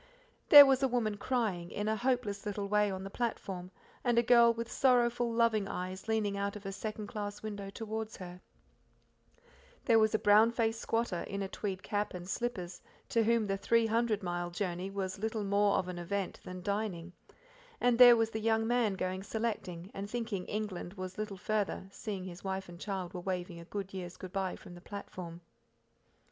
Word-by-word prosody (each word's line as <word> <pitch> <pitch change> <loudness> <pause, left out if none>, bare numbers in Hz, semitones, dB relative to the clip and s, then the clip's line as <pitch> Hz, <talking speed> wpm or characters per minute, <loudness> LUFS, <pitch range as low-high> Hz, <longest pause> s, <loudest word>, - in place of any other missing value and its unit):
There 290 -1 +13
was 270 -1 +3
a 270 - +4
woman 235 -4 0
crying: 205 -7 -1
in 205 +3 -3
a 220 - +2
hopeless 230 -4 -1
little 205 -1 -3
way 210 0 +3
on 190 -1 -4
the 195 - -7
platform, 195 -6 -3 0.3
and 240 -2 +2
a 235 - +5
girl 235 -1 +6
with 230 0 -5
sorrowful, 240 -2 +3
loving 230 -3 +2
eyes 185 +2 -5
leaning 215 -2 0
out 200 0 -2
of 205 -1 -9
a 195 - -3
second 215 +1 -5
class 205 0 -5
window 205 -2 -5
towards 220 +1 -5
her; 180 -1 -9 1.4
there 230 -2 +5
was 220 0 +3
a - - +5
brown 210 +2 +5
faced 225 -1 0
squatter, 225 -6 -1
in 200 0 -3
a - - -2
tweed 190 -1 -4
cap 205 -2 -2
and 175 0 -7
slippers, 185 -4 -3 0.3
to 230 - +3
whom 230 -1 +3
the 195 -1 -1
three 230 +3 +3
hundred 225 -2 +1
mile 175 -1 -2
journey 180 0 -3
was 195 -1 -4
little 220 0 -2
more 200 0 +3
of 185 - -1
an 180 -1 -5
event 195 +2 -3
than 180 0 -8
dining; 195 -4 -2 0.7
and 245 -1 +3
there 245 -1 +10
was 225 0 +1
the 220 - -3
young 225 0 +2
man 235 -4 +2
going 185 0 -2
selecting, 200 -5 -4
and 200 +1 -5
thinking 225 -5 -3
England 205 -3 -4
was 185 0 -6
little 210 -2 -4
farther, 205 -1 -1
seeing 200 -3 -5
his 180 -1 -9
wife 190 0 -3
and 175 0 -11
child 190 -3 -4
were 180 - -5
waving 180 -2 -3
a 195 +4 -5
year's 180 -2 -6
good 185 0 -9
bye 190 -2 -1
from 175 - -12
the 175 - -12
platform. 180 -4 -8
205 Hz, 190 wpm, -32 LUFS, 185-225 Hz, 1.4 s, There